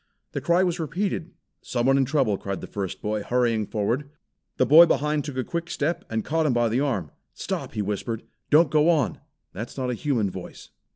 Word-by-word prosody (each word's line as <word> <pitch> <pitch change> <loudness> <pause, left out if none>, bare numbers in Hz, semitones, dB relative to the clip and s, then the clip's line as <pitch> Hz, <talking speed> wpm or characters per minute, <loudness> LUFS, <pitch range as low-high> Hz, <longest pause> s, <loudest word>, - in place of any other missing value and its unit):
The - - -3
cry 175 +1 +3
was 175 -2 0
repeated. 165 +2 -2 0.3
"Someone 130 +2 +1
in 135 -1 +3
trouble," 135 -6 +1
cried 100 0 -4
the - - -7
first 95 -3 -5
boy, 105 0 -1
hurrying 115 -2 +1
forward. 120 +7 -1 0.5
The 130 - +4
boy 160 +6 +9
behind 150 +1 +1
took 140 -2 -6
a 130 - 0
quick 170 +5 -4
step, 170 +3 -2
and 110 -1 -2
caught 160 +1 +1
him 135 - +2
by 120 -1 +2
the 115 +4 +1
arm. 120 - -1 0.2
"Stop!" - - -4
he 105 - -1
whispered. 105 +3 -3 0.3
"Don't 150 0 +5
go 155 +1 +4
on! 150 -9 +1 0.3
That's 110 +8 -7
not 130 -2 -1
a - - -1
human 115 -6 0
voice." 90 -1 -9
130 Hz, 205 wpm, -25 LUFS, 110-155 Hz, 0.5 s, boy